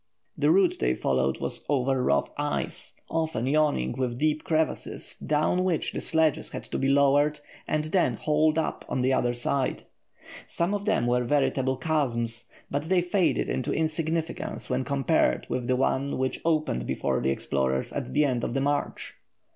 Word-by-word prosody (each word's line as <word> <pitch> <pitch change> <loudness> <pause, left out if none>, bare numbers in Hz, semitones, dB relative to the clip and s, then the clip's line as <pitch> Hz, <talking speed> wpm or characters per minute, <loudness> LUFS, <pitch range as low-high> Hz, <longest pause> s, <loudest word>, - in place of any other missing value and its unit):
The - - +2
route 360 0 +4
they - - +1
followed - - 0
was - - -4
over 135 -2 +1
rough 70 - +1
ice, - - -3
often 160 -7 -1
yawning 145 - +2
with 125 -2 -2
deep 155 +2 +1
crevasses, 160 -1 -2
down 155 +4 +1
which 180 -4 0
the - - -4
sledges 160 -2 +2
had - - -6
to - - -1
be 135 - +1
lowered 140 +2 +3 0.3
and 155 0 0
then 170 +4 +1
hauled 155 +1 +2
up 160 - -1
on 130 - -1
the 130 +1 +2
other 120 -1 +1
side. 130 +2 -1 0.6
Some 170 +4 -1
of 205 0 -2
them 120 - +2
were 125 0 +2
veritable 135 0 +1
chasms, 120 -6 -1 0.3
but 145 +2 -1
they 180 +2 +3
faded 180 0 +1
into 130 - -2
insignificance 160 -1 -2
when 130 +1 +1
compared 135 - +1
with 125 -1 -2
the 130 - +2
one 135 +2 0
which 130 0 -1
opened 155 - 0
before - - -1
the 65 - +1
explorers 65 -1 -1
at - - -4
the 150 0 +3
end 125 -4 0
of - - -2
the 135 - +1
march. 145 +1 -1
140 Hz, 170 wpm, -27 LUFS, 125-160 Hz, 0.6 s, route